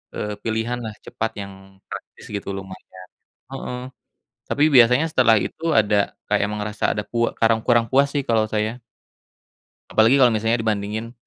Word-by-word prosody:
eee, 105 0 -3
pilihanlah 115 0 -2
cepat 115 0 -3
yang 100 -1 -8 0.4
praktis - - -9
gitu 100 - -5
lumayan. 95 -1 -11 0.4
Heeh. 130 -2 -5 0.7
Tapi 145 - +1
biasanya 125 +4 +6
setelah 120 -6 +5
itu 135 +9 -3
ada 105 -2 +2 0.2
kayak - - +3
emang 105 0 -4
rasa 105 0 -6
ada 105 - -2
kue 115 0 +1
karang 115 0 +3
kurang 120 -1 +4
puas, 140 +1 +4
sih, 140 - +1
kalau 110 -1 +2
saya. 110 +3 -2 1.1
Apalagi 115 +5 +5
kalau 125 -3 +5
misalnya 110 +2 +1
dibandingin 110 +2 -2
110 Hz, 150 wpm, -22 LUFS, 105-120 Hz, 1.1 s, biasanya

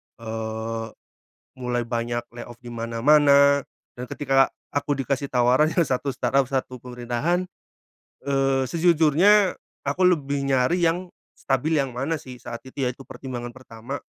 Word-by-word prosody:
eee, 110 0 -4 0.7
mulai 120 -1 -1
banyak 120 0 -2
layoff 120 0 -9
di 120 - -8
mana-mana, 140 +5 +4 0.3
dan 125 0 -7
ketika 135 0 +2 0.2
aku 145 0 -1
dikasih 140 +1 -2
tawaran 125 +4 +3
yang 170 - +4
satu 135 0 -2
startup 130 +2 +1
satu 130 -1 -3
pemerintahan, 125 +9 -2 0.8
eee, 135 -1 +1
sejujurnya 170 +5 +4 0.3
aku 180 +7 0
lebih 145 -6 +2
nyari 135 +8 +2
yang 175 +2 +1 0.2
stabil 145 +4 0
yang 130 -3 -2
mana 150 +5 -2
sih 130 -4 -10
saat 120 -1 -6
itu 135 +1 -5
ya, 125 - +1
itu 130 +2 -14
pertimbangan 120 -2 -7
pertama, 125 +1 -8
135 Hz, 135 wpm, -24 LUFS, 120-145 Hz, 0.8 s, mana-mana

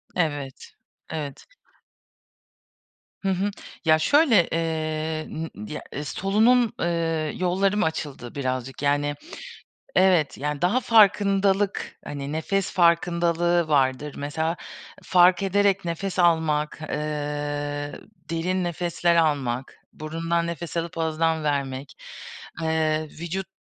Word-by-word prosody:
Evet, 145 -6 -2 0.4
evet. 145 -3 -5 1.8
Hı 195 - 0
hı. 195 +2 0 0.3
Ya 155 0 +5
şöyle, 245 - +4
eee, 155 -1 -2
ımm, 160 +1 -4 0.2
ı - - -9
ya - - -5 0.2
solunum, 220 - +3
eee, 165 -2 -1
yollarım 190 +3 +1
açıldı 145 -6 -4
birazcık, 130 -1 -3
yani, 145 0 +1 0.8
evet, 180 -5 +4
yani, 150 0 -3
daha 195 +9 +3
farkındalık, 200 -3 +3
hani, 140 0 -5
nefes 190 +5 -1
farkındalığı 170 -1 +2
vardır 140 0 +1
mesela 160 +4 -2 0.5
fark 180 +2 +5
ederek 195 -1 +2
nefes 185 +3 -3
almak, 160 -3 +2
eee, 145 -1 -3 0.4
derin 180 +3 -1
nefesler 175 0 0
almak, 135 -6 0 0.2
burundan 165 +2 -2
nefes 170 0 -5
alıp 170 0 -3
ağızdan 160 0 0
vermek, 140 -2 -2 0.7
eee, 155 -1 0
vücut 180 +3 -4
165 Hz, 100 wpm, -25 LUFS, 150-180 Hz, 1.8 s, Ya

